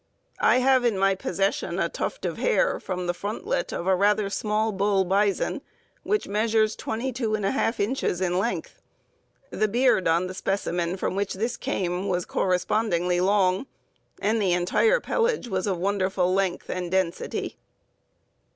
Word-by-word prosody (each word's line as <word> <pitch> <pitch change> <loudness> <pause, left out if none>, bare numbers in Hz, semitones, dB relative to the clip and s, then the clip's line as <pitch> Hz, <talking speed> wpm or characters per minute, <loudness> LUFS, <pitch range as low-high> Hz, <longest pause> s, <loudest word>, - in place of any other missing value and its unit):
I - - +4
have 260 0 +4
in 230 -5 +1
my 195 0 +3
possession 195 +1 -1
a - - +1
tuft - - -4
of - - -3
hair, - - +2
from 180 -1 -4
the 175 - 0
frontlet 380 - -3
of 170 - -4
a 190 0 +3
rather 205 +1 +2
small 215 +1 0
bull 195 -1 +1
bison, 195 +1 +1 0.4
which 420 0 -1
measures 215 +1 +1
221/2 225 -1 -1
inches 205 -4 0
in 180 -1 0
length. 240 - -3 0.7
The 215 +2 +1
beard 240 -3 +2
on 165 +2 +2
the 185 - -5
specimen 185 -2 -2
from 185 - -2
which 200 0 -1
this 230 +5 -2
came 190 -8 -2
was 180 -2 -1
correspondingly 180 -1 0
long, 190 +4 +2 0.5
and 220 +2 +1
the 185 -3 +2
entire 190 - +3
pelage 460 - 0
was 190 -2 -2
of 190 -3 0
wonderful 185 -1 0
length 190 -2 -1
and 180 -1 -3
density. 185 -2 -2
200 Hz, 150 wpm, -25 LUFS, 185-225 Hz, 0.7 s, I